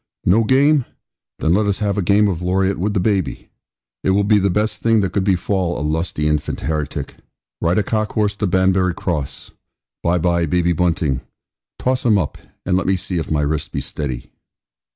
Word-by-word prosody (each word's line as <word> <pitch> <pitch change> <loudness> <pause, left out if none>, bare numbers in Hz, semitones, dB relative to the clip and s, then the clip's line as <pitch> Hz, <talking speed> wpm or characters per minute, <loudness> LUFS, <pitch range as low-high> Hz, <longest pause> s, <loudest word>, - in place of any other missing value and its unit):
'No 105 +6 +4
game! 135 +3 +3 0.5
Then 80 - +1
let 105 +2 +2
us 100 - +1
have 100 -2 -1
a 105 - 0
game 100 +4 +3
of 90 -5 -1
loriot 95 +1 +1
with 105 +3 -1
the - - +3
baby! 95 -2 -1 0.5
It - - +1
will 100 +2 +3
be 105 +1 +4
the 100 0 +2
best 105 +4 -1
thing 115 -2 +3
that 95 -3 -1
could 100 - +1
befall 95 -2 0
a 75 - -3
lusty 80 -1 -1
infant 75 -1 -1
heretic. 75 -2 -3 0.4
Ride 85 +4 +2
a 105 - +3
cock 110 +1 -1
horse 105 -1 +1
to 105 - 0
Banbury 95 -1 +2
Cross. 75 -8 -4 0.5
Bye, 85 +1 +2
bye, 85 -1 +1
baby 85 +2 +2
Bunting; 80 -5 0 0.6
toss 130 0 0
him 110 -4 +4
up, 85 -7 -2 0.3
and 90 - +1
let 95 - 0
me 95 - +3
see 90 -1 -2
if 80 - -5
my 75 -1 +1
wrist 75 0 -2
be - - -2
steady.' 65 -4 -5
95 Hz, 195 wpm, -19 LUFS, 85-105 Hz, 0.6 s, No